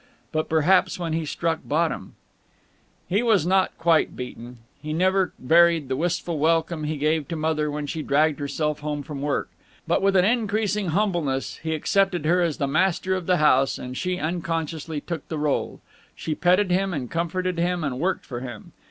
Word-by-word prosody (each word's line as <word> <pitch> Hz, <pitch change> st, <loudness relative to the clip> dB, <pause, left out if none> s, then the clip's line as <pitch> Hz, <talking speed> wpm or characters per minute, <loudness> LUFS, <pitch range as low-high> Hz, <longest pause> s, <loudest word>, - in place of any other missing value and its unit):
But 155 Hz, 0 st, -1 dB
perhaps 160 Hz, +4 st, +3 dB
when 170 Hz, -3 st, -3 dB
he 160 Hz, -1 st, -2 dB
struck 165 Hz, +2 st, -1 dB
bottom 160 Hz, +2 st, -1 dB, 0.9 s
He 200 Hz, +5 st, +1 dB
was 220 Hz, -8 st, +3 dB
not 190 Hz, +1 st, +2 dB
quite 165 Hz, -1 st, +2 dB
beaten. 125 Hz, -1 st, -8 dB, 0.2 s
He 155 Hz, +1 st, -4 dB
never 185 Hz, +3 st, +2 dB
varied 165 Hz, +3 st, +4 dB
in -, -, -14 dB
the 130 Hz, -, 0 dB
wistful 170 Hz, +1 st, -1 dB
welcome 160 Hz, 0 st, +1 dB
he 155 Hz, 0 st, -2 dB
gave 155 Hz, +1 st, 0 dB
to 170 Hz, -, -4 dB
Mother 155 Hz, -1 st, 0 dB
when 150 Hz, 0 st, -3 dB
she 155 Hz, +2 st, -4 dB
dragged 150 Hz, +1 st, +2 dB
herself 150 Hz, +1 st, -2 dB
home 150 Hz, -1 st, -3 dB
from 140 Hz, -1 st, -7 dB
work. 145 Hz, 0 st, -1 dB, 0.4 s
But -, -, +2 dB
with 195 Hz, 0 st, +2 dB
an 180 Hz, -1 st, +5 dB
increasing 210 Hz, -3 st, 0 dB
humbleness 170 Hz, -7 st, -1 dB
he 160 Hz, 0 st, -1 dB
accepted 180 Hz, 0 st, +1 dB
her 175 Hz, +3 st, +3 dB
as 165 Hz, -4 st, 0 dB
the 140 Hz, -, 0 dB
master 185 Hz, +5 st, +1 dB
of 185 Hz, -2 st, -3 dB
the 180 Hz, -1 st, +3 dB
house, 135 Hz, -3 st, +3 dB
and 125 Hz, 0 st, -7 dB
she 180 Hz, +5 st, -2 dB
unconsciously 165 Hz, -2 st, -3 dB
took 165 Hz, -2 st, -6 dB
the 160 Hz, -, -4 dB
rôle. 150 Hz, -1 st, -1 dB, 0.3 s
She 160 Hz, -, -3 dB
petted 180 Hz, +4 st, +2 dB
him 190 Hz, 0 st, +1 dB
and 125 Hz, -4 st, -5 dB
comforted 175 Hz, +1 st, -1 dB
him 175 Hz, 0 st, 0 dB
and 135 Hz, -3 st, -2 dB
worked 185 Hz, +5 st, -1 dB
for 120 Hz, -3 st, -5 dB
him. 120 Hz, -4 st, -8 dB
160 Hz, 185 wpm, -24 LUFS, 150-180 Hz, 0.9 s, an